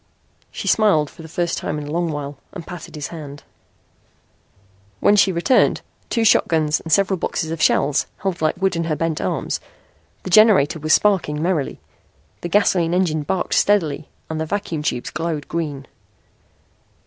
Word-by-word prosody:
She - - -7
smiled 190 -9 +3
for - - -13
the 160 - -10
first 170 +1 -2
time 150 - -3
in 150 - -5
a 145 - -7
long 170 0 -1
while 145 -2 -6
and 165 - -8
patted 175 -2 -9
his 150 -1 -5
hand. 145 -4 -9 1.6
When 205 - +4
she 200 -1 +4
returned, 175 +9 +2 0.3
two 230 - +1
shotguns 155 -7 +3
and 160 - -8
several 195 +2 +3
boxes 160 -1 -3
of 165 -1 -4
shells 140 -1 +2
held 190 -4 -3
like 155 +3 0
wood 190 -1 +1
in 165 0 -1
her 160 -2 -1
bent 165 0 -2
arms, - - -2 0.6
the 185 - -6
generator 190 -7 +5
was 155 +1 -2
sparkling 185 -8 +2
merrily. 170 -6 -1 0.6
The 175 - -4
gasoline 175 -3 +2
engine 165 -4 +1
barked 180 +5 -2
steadily 155 -8 +1 0.2
and 160 0 -4
the 160 - -3
vacuum 185 -5 -3
tubes 125 -5 -2
glowed 155 -2 -3
green. 150 -5 -4
165 Hz, 165 wpm, -21 LUFS, 150-185 Hz, 1.6 s, generator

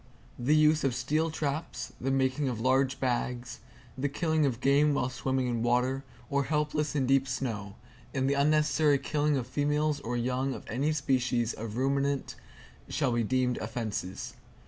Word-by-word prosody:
The 135 +5 +3
use 155 0 +4
of 135 -3 +1
steel 150 +5 0
traps, 155 0 -3
the 135 - -1
making 135 +1 +1
of 120 -3 -3
large 130 +2 +2
bags, 125 -1 -2 0.4
the 140 +2 -1
killing 155 0 +1
of 120 -3 -2
game 140 +2 +3
while 125 -3 0
swimming 130 0 -1
in 120 -2 -1
water, 125 +3 +1 0.2
or 140 -1 0
helpless 150 0 0
in 135 -3 +2
deep 135 +1 +3
snow, 115 -6 -3 0.4
and 135 -1 0
the 140 - +2
unnecessary 150 +1 +3
killing 145 +1 0
of 125 - -2
females 150 +3 0
or 120 -1 -3
young 130 +2 -1
of - - -9
any 135 +7 0
species 125 -5 +1
of 110 0 -6
ruminant, 140 +1 0 0.6
shall 140 -4 0
be 120 0 +1
deemed 125 +2 +1
offenses. 110 -4 -4
135 Hz, 165 wpm, -29 LUFS, 125-145 Hz, 0.6 s, use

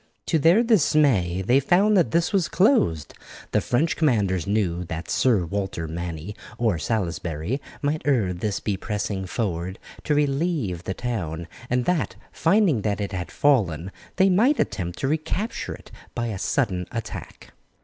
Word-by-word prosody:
To 160 - +1
their 170 +10 +5
dismay 140 - +3
they 125 +7 +4
found 190 +9 +3
that 175 - +4
this 170 - +1
was 190 -4 +2
closed. 170 - +2 0.4
The - - +2
French 155 +7 +1
commanders 100 - +1
knew 95 -4 0
that 80 0 -5
Sir 110 -9 +3
Walter 95 -2 -3
Manny 85 +3 -5 0.2
or 110 -8 +1
Salisbury 85 - -2 0.2
might 150 +2 0
ere 115 -11 +2
this 95 +3 -2
be 100 -3 -2
pressing 100 -3 -3
forward 90 -2 -3 0.3
to 150 - +2
relieve 140 - 0
the 95 - -3
town, 85 -10 -3 0.2
and 125 0 +1
that, 180 -4 0 0.2
finding 170 - +3
that 100 -1 -1
it 100 0 -3
had 90 -3 -4
fallen, 95 - +1 0.2
they 190 - +4
might 230 +10 +3
attempt 90 -2 -2
to 135 - -1
recapture 160 - -2
it - - -16 0.2
by 120 -1 -1
a 100 -4 -4
sudden 90 -1 0
attack. 115 -3 -7
110 Hz, 155 wpm, -24 LUFS, -, 0.4 s, their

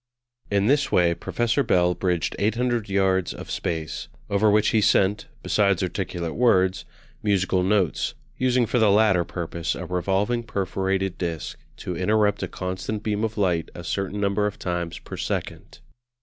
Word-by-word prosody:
In 100 -1 +2
this 140 +3 +2
way 85 -1 +4
Professor 120 +9 0
Bell 90 -8 +3
bridged 90 -2 -1
800 115 +1 0
yards 95 -2 +1
of - - -8
space; 80 -2 -3 0.2
over 100 +2 +3
which 105 +1 +4
he 110 - +3
sent, 100 0 +2 0.2
besides 100 -3 +2
articulate 90 -2 -3
words, 95 -6 +2 0.4
musical 95 -3 +1
notes, 95 -2 +1 0.2
using 125 -1 +2
for 120 +3 0
the 110 -2 +5
latter 100 -3 +4
purpose 85 -1 -3
a 90 - -6
revolving 95 +6 0
perforated 95 -3 -2
disc 85 -3 -3 0.2
to 90 - -5
interrupt 105 +3 +2
a - - -2
constant 95 +3 -4
beam 105 0 -1
of 110 0 -2
light 90 -5 +1
a 85 - -7
certain 100 +3 -3
number 100 +1 +1
of 105 - -5
times 85 -2 -3
per - - -9
second. - - -4
100 Hz, 155 wpm, -24 LUFS, 90-105 Hz, 0.4 s, the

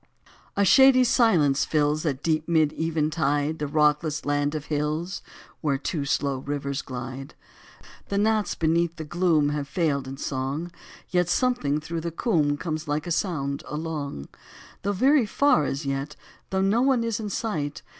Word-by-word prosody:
A 200 - +4
SHADY 265 +5 +7
silence 180 - +3
fills, 150 +1 +1
At 135 -1 -2
deep 155 -1 0
mid 160 -3 +2
eventide, 155 -1 0
The 150 - -2
rockless 150 +1 +1
land 145 +1 0
of 150 -2 -4
hills 155 +5 -2 0.4
Where 145 -4 +1
two 145 +1 -3
slow 140 -1 0
rivers 140 0 -3
glide. 130 +2 -7 0.7
The 200 - -1
gnats 215 0 +1
beneath 165 +1 +1
the 160 - -6
gloom 160 -2 +2
Have 145 -1 -3
failed 150 -4 -1
in 135 +1 -7
song, 140 +5 -3 0.4
Yet 180 -1 +1
something 175 - +1
through 165 +2 -5
the 170 - -3
combe 155 -5 +1
Comes 155 0 -4
like 150 +1 -1
a 175 - -4
sound 145 -6 -1
along. 150 - -5 0.5
Though 200 - -1
very 260 +4 +3
far 280 - +3
as 140 +2 -3
yet, 140 +2 -3 0.3
Though 190 0 0
no 200 +5 +2
one 260 -3 +3
is 230 -1 -2
in 215 -2 -4
sight. 155 -9 -3
155 Hz, 160 wpm, -25 LUFS, 145-180 Hz, 0.7 s, SHADY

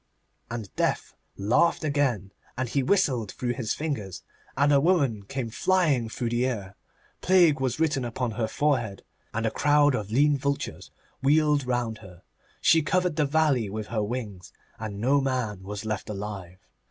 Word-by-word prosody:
And 115 -4 -6
Death - - -1 0.2
laughed 125 +13 +2
again, 135 - 0 0.3
and 130 0 -1
he 140 +4 0
whistled 130 - +1
through 120 -1 -2
his 120 -3 -2
fingers, 125 - -4 0.3
and 145 +1 +4
a 140 - +5
woman 140 - +2
came 125 0 -4
flying 150 -7 +2
through 115 +1 -3
the 120 +2 +1
air. 100 -6 -4 0.5
Plague 175 -6 +4
was 130 0 -1
written 155 -5 +1
upon 120 0 -2
her 110 +1 -2
forehead, 120 -6 -1 0.3
and 115 +1 -2
a 110 - +1
crowd 145 0 +3
of 105 -5 -3
lean 140 +5 +3
vultures 140 +1 -3 0.3
wheeled 150 -1 +3
round 120 -3 -1
her. 95 -4 -14 0.4
She 165 - +5
covered 180 +2 0
the 150 -2 +1
valley 140 -7 +2
with 110 +1 -4
her 110 -2 -1
wings, 105 -4 -5 0.3
and 105 -2 -5
no 135 +5 +3
man 125 -7 -2
was 100 +2 -6
left 110 -1 -3
alive. 100 -3 -6
125 Hz, 165 wpm, -26 LUFS, 110-145 Hz, 0.5 s, a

